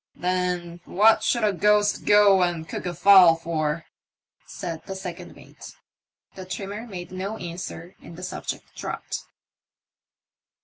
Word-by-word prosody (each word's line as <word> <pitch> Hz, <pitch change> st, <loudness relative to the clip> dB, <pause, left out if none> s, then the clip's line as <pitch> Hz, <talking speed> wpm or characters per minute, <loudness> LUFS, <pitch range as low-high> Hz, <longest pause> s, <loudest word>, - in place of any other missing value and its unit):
*' -, -, -52 dB
Then 180 Hz, -1 st, -2 dB
what 215 Hz, +4 st, +4 dB
should 235 Hz, -2 st, +1 dB
a 210 Hz, -1 st, +2 dB
ghost 210 Hz, +2 st, +2 dB
go 205 Hz, -2 st, +6 dB
and 170 Hz, -3 st, -1 dB
cook -, -, -5 dB
a 175 Hz, -, -3 dB
fowl 185 Hz, -2 st, +7 dB
for? 160 Hz, -1 st, -2 dB, 0.3 s
" -, -, -70 dB, 0.3 s
said 165 Hz, -3 st, -6 dB
the 195 Hz, -, -5 dB
second 180 Hz, -3 st, -8 dB
mate. -, -, -13 dB, 0.6 s
The 190 Hz, -, -9 dB
trimmer 200 Hz, +5 st, -6 dB
made 180 Hz, -5 st, -8 dB
no 195 Hz, +4 st, -4 dB
answer, 175 Hz, 0 st, -7 dB
and 165 Hz, -, -12 dB
the 180 Hz, -, -9 dB
subject 185 Hz, -, -6 dB
dropped. -, -, -5 dB
180 Hz, 145 wpm, -24 LUFS, 170-200 Hz, 0.6 s, fowl